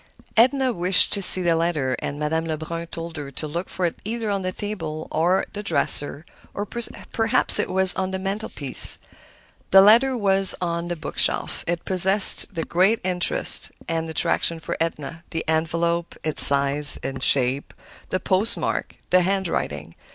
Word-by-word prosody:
Edna 260 +2 +2
wished 180 0 +4
to 200 - +1
see 185 -1 +9
the 170 -1 +1
letter, 155 -6 -2
and 145 - -6
Madame 160 +2 -3
Lebrun 165 +1 -6
told 165 0 -9
her 145 -2 -7
to 155 - -6
look 170 +5 -6
for 185 - -3
it 170 - -4
either 225 0 -4
on 200 -1 -3
the 185 0 -4
table 165 -7 -7
or 175 +4 0
the 205 - -7
dresser, 150 -6 0 0.3
or 205 - -4
perhaps 230 +1 +1
it - - -2
was 190 0 +3
on 190 0 -4
the 190 - -5
mantelpiece. 195 -7 +4 0.7
The 195 - +6
letter 240 +6 +4
was 195 -3 +1
on 170 -1 -4
the 175 - -4
bookshelf. 155 - -1
It 170 0 -4
possessed 190 +1 +3
the 165 - -3
greatest 190 +5 0
interest 180 -2 +1 0.2
and 165 -1 -4
attraction 165 +1 +1
for - - -6
Edna; 165 -1 -5
the 165 - -6
envelope, 170 +2 -2
its 155 -1 0
size 140 +1 +1
and 135 -1 -6
shape, 135 +1 +1 0.4
the 185 - -2
post 190 +4 -1
mark, - - -4 0.2
the 185 - +4
handwriting. 170 - -4
170 Hz, 165 wpm, -21 LUFS, 160-195 Hz, 0.7 s, see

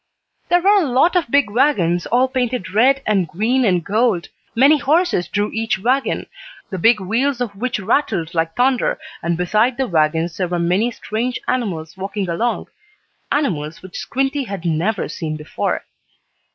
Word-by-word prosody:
There 350 0 +4
were 400 +1 +5
a 320 - 0
lot 265 +9 +3
of 340 -9 +1
big 280 -5 +2
wagons, 205 - +2
all 250 +2 +3
painted 250 -6 -2
red 265 +5 +4
and 195 -5 +1
green 225 +11 +1
and 180 -6 +1
gold. 215 -4 +1 0.3
Many 280 +5 +5
horses 310 - +1
drew 205 0 -1
each 225 +1 -1
wagon, 255 +7 0 0.5
the 190 - -3
big 225 +4 +4
wheels 235 +8 0
of 235 -5 -3
which 235 +2 -2
rattled 195 - 0
like 165 -1 -1
thunder, 255 0 +2 0.2
and 170 0 -1
beside 215 +8 +1
the 265 - +1
wagons 160 -1 0
there 185 - 0
were 175 0 -2
many 180 +7 +1
strange 240 +1 -3
animals 185 -10 -2
walking 195 0 -3
along 225 +8 -1 0.7
animals 165 - -1
which 185 - -11
Squinty 270 +1 -1
had 195 -5 -6
never 175 +6 0
seen 155 -2 -4
before. 150 - -3
215 Hz, 165 wpm, -19 LUFS, 175-255 Hz, 0.7 s, were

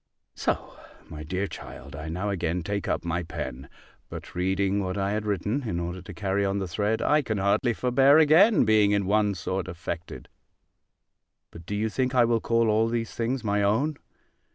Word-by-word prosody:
So, - - -2 0.4
my 75 - -8
dear 90 +6 -2
child, 70 -6 -9
I 80 +2 -6
now 95 +5 -2
again 85 -2 -2
take 100 +3 -3
up - - -1
my 85 +1 -1
pen: 75 -6 -6 0.4
but - - -9
reading 95 +2 0
what 95 0 -3
I 100 0 0
had 105 0 -2
written, 105 +7 -1
in 85 - -2
order 90 +1 -4
to 90 - -10
carry 100 -1 0
on 100 0 0
the 95 -2 -2
thread, 105 +6 -1
I 150 +1 +3
can 110 -6 -3
hardly 105 +5 +1
forbear 135 +5 +4
again 160 - +6
being 110 -2 +4
in 100 -1 +1
one 105 0 +2
sort 95 +1 -3
affected. 85 -1 -6 1.2
But 85 0 -12
do 105 - -3
you 110 +2 0
think 130 +3 -1
I 120 -2 +6
will 115 -1 +1
call 115 0 +2
all 110 +1 +3
these 115 -1 -2
things 120 +2 -2
my 105 -1 +1
own? 120 +10 +1
100 Hz, 190 wpm, -26 LUFS, 90-115 Hz, 1.2 s, again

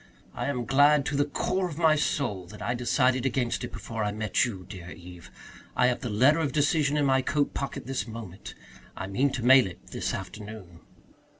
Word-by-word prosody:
I - - -3
am 125 -4 -2
glad 145 +3 +4
to 145 - -2
the 145 +1 +2
core 185 +5 -1
of 155 - -8
my 160 -2 +4
soul 120 -11 -1
that 105 +3 -11
I 115 +3 -1
decided 125 +1 +1
against 125 -2 -1
it - - -5
before 110 0 -5
I 105 - 0
met 105 +2 +1
you, 95 -7 -6
dear 95 -3 -9
Eve. 90 -1 -12 0.5
I 125 - +3
have 125 -1 +2
the 125 - -4
letter 130 +9 +4
of 145 -5 -1
decision 150 0 +2
in 145 - +2
my 135 -1 +3
coat 145 +2 0
pocket 140 - -4
this 130 -1 -3
moment. 110 -5 -9 0.4
I - - -4
mean 115 +9 +1
to 120 - -3
mail 130 -2 +7
it 90 - -12
this - - -2
afternoon." 95 -2 -9
125 Hz, 205 wpm, -27 LUFS, 105-140 Hz, 0.5 s, mail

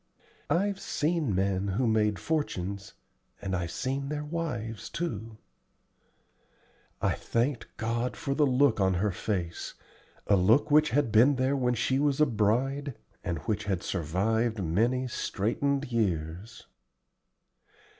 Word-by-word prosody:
"I've 195 +6 +1
seen 150 - 0
men 95 +1 0
who 100 +7 0
made 105 -3 +2
fortunes, 100 - -3 0.4
and 95 -1 -2
I've 85 -2 -2
seen 135 +7 -3
their 150 0 -3
wives 120 - -4
too." 115 - -4 1.7
I - - +3
thanked 120 +2 -1
God 115 +2 -2
for 140 - -2
the 145 +1 +3
look 130 -2 +3
on 95 -1 +3
her 100 +3 +1
face 90 -3 -3 0.5
a 100 - +4
look 110 +11 +4
which 150 +1 +5
had 145 -4 +1
been 120 +6 +6
there 130 +2 +1
when 125 -2 +1
she 130 +4 +1
was 145 -1 +1
a 150 - +6
bride, 130 +4 0 0.3
and 85 -5 -2
which 105 -1 -1
had 95 -3 -1
survived 100 +6 0
many 120 +10 +1
straitened 130 +5 -1
years. 95 -1 -2
115 Hz, 130 wpm, -29 LUFS, 100-140 Hz, 1.7 s, been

